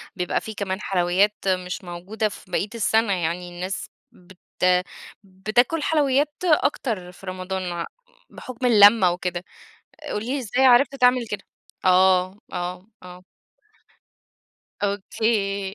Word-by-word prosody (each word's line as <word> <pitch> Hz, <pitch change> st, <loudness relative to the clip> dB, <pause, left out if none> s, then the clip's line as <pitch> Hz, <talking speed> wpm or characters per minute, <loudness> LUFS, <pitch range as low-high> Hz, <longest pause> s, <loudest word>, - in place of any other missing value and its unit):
بيبقى 180 Hz, -2 st, -1 dB
في 220 Hz, -, -7 dB
كمان 200 Hz, -1 st, -4 dB
حلويات 190 Hz, +3 st, +1 dB
مش 180 Hz, 0 st, -1 dB
موجودة 185 Hz, +5 st, -3 dB
في 185 Hz, -, -13 dB
بَقِيَّة 195 Hz, +3 st, -1 dB
السَّنَة، 220 Hz, -1 st, +2 dB
يعني 175 Hz, 0 st, -2 dB
الناس 180 Hz, +2 st, -5 dB, 0.2 s
بت 180 Hz, +1 st, -19 dB, 0.9 s
بتاكُل 215 Hz, +11 st, 0 dB
حلويات 290 Hz, -1 st, +2 dB
أكتر 240 Hz, -, 0 dB
في 180 Hz, -, -15 dB
رمضان، 185 Hz, 0 st, -4 dB
ع 170 Hz, -1 st, -3 dB, 0.4 s
بحُكم 255 Hz, 0 st, -7 dB
اللمّة 205 Hz, -4 st, +7 dB
وكده، 175 Hz, 0 st, -4 dB, 0.7 s
قُل 210 Hz, +1 st, -3 dB
لي 270 Hz, +4 st, -2 dB
إزاي 250 Hz, +2 st, +1 dB
عرفت 260 Hz, +2 st, +5 dB
تعمل 250 Hz, -2 st, +3 dB
كده؟ 210 Hz, -2 st, -5 dB, 0.4 s
آه، 185 Hz, +1 st, +4 dB, 0.2 s
آه، 180 Hz, +2 st, -5 dB, 0.2 s
آه. 180 Hz, 0 st, -12 dB, 1.6 s
أوكي. 200 Hz, -1 st, -1 dB
195 Hz, 120 wpm, -23 LUFS, 180-230 Hz, 1.6 s, اللمّة